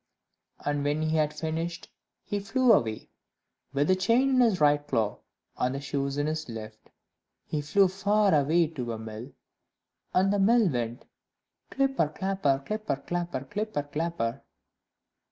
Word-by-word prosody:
And 145 -1 0
when 145 +2 0
he 155 0 0
had 150 -1 +2
finished, 165 +2 -4 0.4
he 205 - -2
flew 245 +4 +3
away, 110 - 0 0.6
with 140 +1 +1
the 185 - +4
chain 230 +8 +3
in 260 - +3
his 225 -6 +3
right 145 -1 +4
claw 110 -5 0 0.4
and 125 +1 0
the - - -3
shoes 140 0 -2
in 145 - +1
his 155 -2 -3
left. 110 -1 -9 0.6
He 150 - -2
flew 190 +7 +4
far 200 +2 +2
away 155 +4 +4
to 125 -7 -4
a - - -4
mill, 110 +4 -8 0.8
and 195 +2 +3
the 205 - +1
mill 225 +2 +5
went 120 -1 -3 0.6
"Clipper, 270 - +1
clapper, 155 -5 0
clipper, 215 -7 -2
clapper, 170 0 -3
clipper, 210 -2 -3
clapper." 145 -5 -3
155 Hz, 150 wpm, -28 LUFS, 140-195 Hz, 0.8 s, mill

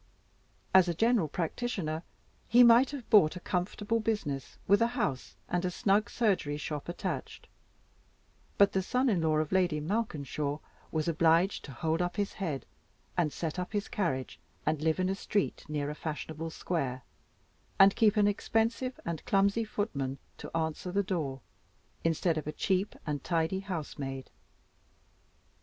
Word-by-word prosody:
As 185 -1 +7
a 170 - -1
general 225 -3 +3
practitioner, 165 -1 -2 0.5
he 245 +2 +7
might 235 +2 +7
have 275 -5 -7
bought 185 -7 +6
a - - -5
comfortable 205 +6 -1
business, 205 - -2
with 200 +2 +5
a 230 - +5
house 160 - -2
and 180 +1 0
snug 200 +3 +2
surgery 190 -11 +1
shop 150 +1 -5
attached; 175 - -4 1.1
but 200 0 +6
the 190 - +1
son 250 +7 +1
in 190 -7 +2
law 155 -1 +2
of 155 -1 0
Lady 180 -5 +2
Malkinshaw 150 - -2 0.3
was 155 0 -1
obliged 165 +3 +3
to 140 - -9
hold 160 +6 -1
up 175 0 -1
his 205 -1 -1
head, 160 -9 -3 0.5
and 170 -4 +1
set 165 +3 -3
up 180 +4 -4
his 205 0 -1
carriage, 135 -10 -2 0.3
and 155 -1 0
live 160 +2 +1
in 185 - +2
a 190 - +1
street 200 0 -1
near 145 -1 -2
a - - -4
fashionable 160 +1 -5
square, 135 -7 -3 0.7
and 195 +1 +7
keep 215 -1 +4
an 205 -1 +5
expensive 225 +5 0
and 170 -2 -3
clumsy 200 +3 +3
footman 140 - -3 0.2
to - - -7
answer 160 +2 -2
the 200 +2 +1
door, 155 - -2 0.6
instead 165 0 +1
of 150 - -8
a - - -1
cheap 190 +5 0
and 145 -4 -3
tidy 165 +2 0
housemaid. 145 -8 -5
175 Hz, 155 wpm, -30 LUFS, 155-205 Hz, 1.1 s, As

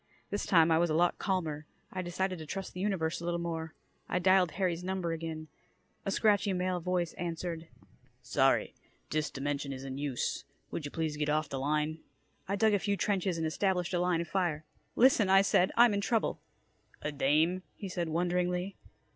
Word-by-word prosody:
This 205 - -2
time 165 -3 +5
I 160 - +5
was 170 0 +2
a 155 - +1
lot 175 +2 +2
calmer. 160 -6 -2 0.3
I 185 - -2
decided 185 +1 -2
to 155 - -8
trust 195 +4 -5
the 180 - -7
universe 180 -5 -1
a - - -7
little 170 0 -1
more. 165 -1 -4 0.3
I - - +1
dialed 185 -1 +4
Harry's 180 -2 -1
number 185 -2 -2
again. 160 -1 -5 0.6
A - - 0
scratchy 205 -1 +3
male 180 0 0
voice 175 -1 -1
answered: 170 -1 -4 0.6
"Sorry, 135 +1 +2 0.4
dis 155 0 0
dimension 140 0 -3
is 135 0 -6
in 135 0 -5
use. 140 -4 -2 0.3
Would 155 - -4
ya 145 - -5
please 160 -2 -2
get 150 0 -1
off 150 -1 +1
da 135 - -3
line?" 150 +3 0 0.5
I 200 - 0
dug 215 +1 +3
a 205 - +3
few 200 +1 0
trenches 190 -4 0
and 165 - -1
established 180 +2 0
a 175 - +2
line 175 -1 +2
of 170 - -5
fire. 165 -4 -1 0.3
"Listen," 235 -6 +5
I 195 0 +7
said. 185 -1 +3
"I'm 235 -2 +7
in 200 - 0
trouble." 225 +2 0 0.6
"A 150 - -1
dame," 155 +6 +2
he 200 - -6
said 175 -2 -2
wonderingly. 180 +3 0
175 Hz, 190 wpm, -31 LUFS, 155-190 Hz, 0.6 s, I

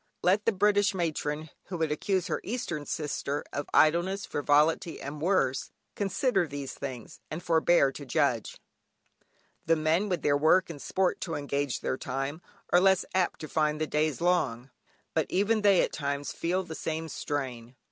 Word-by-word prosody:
Let 195 +4 +3
the - - +6
British 205 0 +3
matron 155 -3 -2
who 180 - -5
would 160 -2 0
accuse 185 +4 0
her - - -2
Eastern 195 -10 -4
sister 145 -1 -3
of 145 - -4
idleness, 175 +5 +3
frivolity, 150 +4 +2
and 145 +2 -7
worse, 155 -7 +1 0.2
consider 200 - +1
these 140 -2 -6
things, 130 -5 -7
and 155 +3 -5
forbear 165 -3 +4
to 145 - -8
judge. 135 - 0 1.1
The 165 - +5
men, 160 +6 +1
with 180 - -1
their 145 - +3
work 160 +5 +3
and 145 -4 -9
sport 190 -1 0
to 165 -3 -3
engage 145 -2 -2
their - - -1
time, 135 +5 -3 0.3
are 175 - +6
less 190 -1 +4
apt 185 -2 0
to 155 - -5
find 155 0 0
the 155 - +1
days 155 0 0
long; 135 -8 +1 0.4
but - - +1
even 210 +4 +2
they 200 -3 +5
at - - -2
times 140 -1 -2
feel 180 +3 -1
the 160 - -8
same 160 0 -3
strain. 130 -6 -4
160 Hz, 165 wpm, -29 LUFS, 145-185 Hz, 1.1 s, the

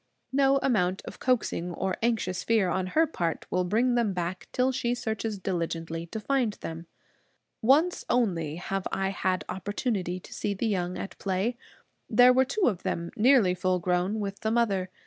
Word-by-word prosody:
No 275 0 +4
amount 190 -7 +1
of - - -9
coaxing 195 -8 0
or 190 +3 -1
of - - -4
anxious 225 -6 0
fear 220 -5 +2
on 185 +1 -1
her 325 - +6
part 170 - -3
will 180 - +2
bring 230 +7 +2
them 235 -5 +1
back, 180 +1 -4
till 255 +1 +2
she 245 -1 -1
searches 220 -2 -3
diligently 165 -3 -3
to 220 - -5
find 245 -1 0
them. 165 -2 -7 0.7
Once 300 +10 +3
only 170 -11 +1
have 195 +2 -3
I 195 0 0
had 185 -1 -1
opportunity 190 -1 -2
to - - -12
see 205 - -2
the 215 - -2
young 180 -4 -1
at 195 - -6
play. 195 +5 -1 0.5
There 250 0 +7
were 260 +1 +4
two 345 +11 -3
of 200 -8 +1
them, 170 0 -3
nearly 230 -5 +5
full 185 0 +1
grown, 180 +4 0
with 200 -1 -4
the 220 - -1
mother. 205 -5 +1
195 Hz, 180 wpm, -28 LUFS, 180-240 Hz, 0.7 s, There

